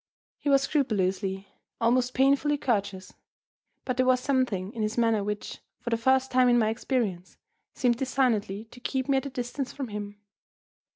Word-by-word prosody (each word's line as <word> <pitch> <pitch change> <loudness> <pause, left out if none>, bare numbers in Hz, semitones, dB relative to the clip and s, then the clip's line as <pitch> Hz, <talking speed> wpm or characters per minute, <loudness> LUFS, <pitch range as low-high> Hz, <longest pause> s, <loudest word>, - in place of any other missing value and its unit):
He 290 - -2
was 275 -1 +4
scrupulously, 195 -8 0 0.3
almost 245 +2 +2
painfully, 280 +2 +3
courteous; 200 -8 -2 0.7
but 255 -1 -2
there 255 - +3
was 255 0 +4
something 250 -8 -1
in 230 - -4
his 215 +2 -2
manner 225 -3 +2
which, 210 0 -4 0.2
for 235 - -5
the - - +3
first 260 +3 +2
time 255 -1 +4
in 240 - +5
my 220 -2 +3
experience, 220 -6 -2 0.4
seemed 245 -3 +2
designedly 230 -6 0
to 245 - -13
keep 260 +1 -2
me 275 -1 +3
at 265 - -1
a - - -5
distance 255 +1 -4
from 270 -4 -5
him. 205 0 -6
240 Hz, 170 wpm, -27 LUFS, 210-260 Hz, 0.7 s, in